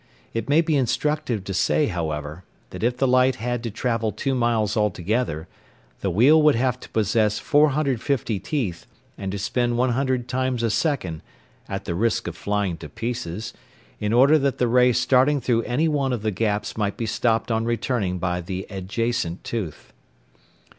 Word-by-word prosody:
It 115 +4 -3
may 150 +3 +5
be 160 -2 0
instructive 135 -3 0
to 100 - -5
say, 150 +10 +2
however, 80 - -4 0.3
that - - -7
if 120 +2 +1
the 135 - +2
light 130 0 +4
had 120 +1 -3
to 115 - -3
travel 115 0 -1
two 135 +4 -2
miles 115 -4 +1
altogether, 105 -4 -1 0.5
the 100 - -1
wheel 130 - +5
would 150 -3 +5
have 125 +1 0
to - - -12
possess 110 0 +1
450 140 -6 +1
teeth 115 - -3 0.3
and 95 -1 -5
to 100 - -3
spin 120 +5 0
100 130 0 0
times 130 -1 -1
a 115 - +1
second 110 - -1 0.5
(at - - -4
the - - -2
risk 110 +6 0
of 85 - -5
flying 100 -3 -1
to 75 -2 -9
pieces) 115 +1 -4 0.5
in 105 0 -1
order 135 +6 +6
that 140 -1 0
the 125 - +2
ray 125 +1 +5
starting 130 +4 +3
through 120 -2 +1
any 130 +6 +1
one 140 -4 0
of 115 -4 -3
the 110 - +1
gaps 105 +1 -1
might 105 -2 -1
be 115 - -2
stopped 115 +1 0
on 110 0 0
returning 115 -5 -1
by 90 0 -1
the 95 +2 -5
adjacent 100 -1 -2
tooth. 100 -10 -5
115 Hz, 175 wpm, -23 LUFS, 100-130 Hz, 0.5 s, order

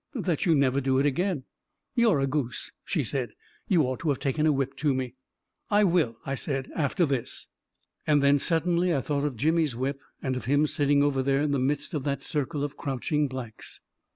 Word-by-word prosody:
" - - -54
" - - -45 0.2
That 165 +1 0
you 165 - +5
never 140 -1 +2
do 130 0 +1
it 135 - +3
again! 165 +1 0 0.2
" - - -55
" - - -57
You're 230 - +4
a - - +3
goose! 135 -3 -2
" - - -57
she 160 -6 +1
said. 125 -2 -3 0.2
" - - -34
You 175 -5 +4
ought 130 -1 -2
to 165 - -1
have 140 - +2
taken 150 +4 0
a - - +5
whip 135 -1 -1
to 145 -2 +1
me! 130 -2 -3 0.3
" - - -50
"I 210 0 +4
will," 170 - +2
I 135 - -2
said, 135 -1 -3
"after 165 +3 +1
this!" 135 -5 -2 0.6
And 145 -2 +4
then 140 0 +5
suddenly 170 +2 +1
I 135 - +1
thought 145 +1 -1
of 140 -5 -2
Jimmy's 155 0 +2
whip, 135 +3 -2 0.2
and 130 -1 -2
of 125 - -5
him 145 +3 +3
sitting 145 -1 +2
over 140 -2 +2
there 135 +2 +1
in 150 - 0
the 140 - +1
midst 140 +4 -1
of 150 -4 -2
that 140 -2 -1
circle 150 -1 -2
of 145 0 -4
crouching 140 +3 -1
blacks 130 -4 -7
140 Hz, 235 wpm, -27 LUFS, 135-155 Hz, 0.6 s, you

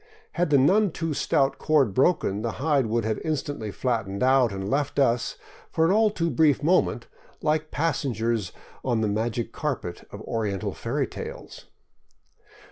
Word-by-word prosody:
Had 175 0 0
the 145 - +5
none 195 +10 +4
too 165 -1 -3
stout 135 -1 +1
cord 140 -9 +2
broken, 130 - +2
the 115 0 -2
hide 140 -4 +1
would 115 0 0 0.2
instantly 145 -6 -3
have 100 - -7
flattened 110 -5 -1
out 130 -3 +4
and 95 0 -4
left 140 +5 -1
us 120 -4 +1 0.2
— - - -24
for 160 - +2
an 165 - +3
all 215 +2 +4
too 170 -5 -1
brief 150 -3 +3
moment 180 +4 +2 0.2
— - - -29
like 155 0 0
passengers 120 - -1 0.3
on 120 -4 0
the 110 - +1
magic 115 +2 -2
carpet 125 - -4
of - - -9
oriental 105 -4 -2
fairy - - -2
tales. - - -9
135 Hz, 165 wpm, -25 LUFS, 115-155 Hz, 0.3 s, the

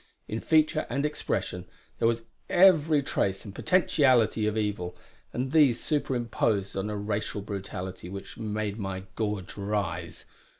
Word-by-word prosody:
In 110 - -3
feature 155 +1 +2
and 140 +1 0
expression 150 0 -2 0.3
there - - +4
was 115 0 0 0.3
every 160 -5 +5
trace 95 -6 -1
and 100 - -8
potentiality 130 - +3
of 105 +1 -1
evil; 100 -4 -2 0.3
and 130 +2 -2
these 145 -7 +5
superimposed 120 -8 0
on 95 +2 -2
a 105 - -3
racial 105 0 -2
brutality 95 -3 -6
which 100 +1 -8
made 110 -1 -3
my 95 -2 -4
gorge 105 -4 -3
rise. 100 0 -3
110 Hz, 135 wpm, -28 LUFS, 100-135 Hz, 0.3 s, every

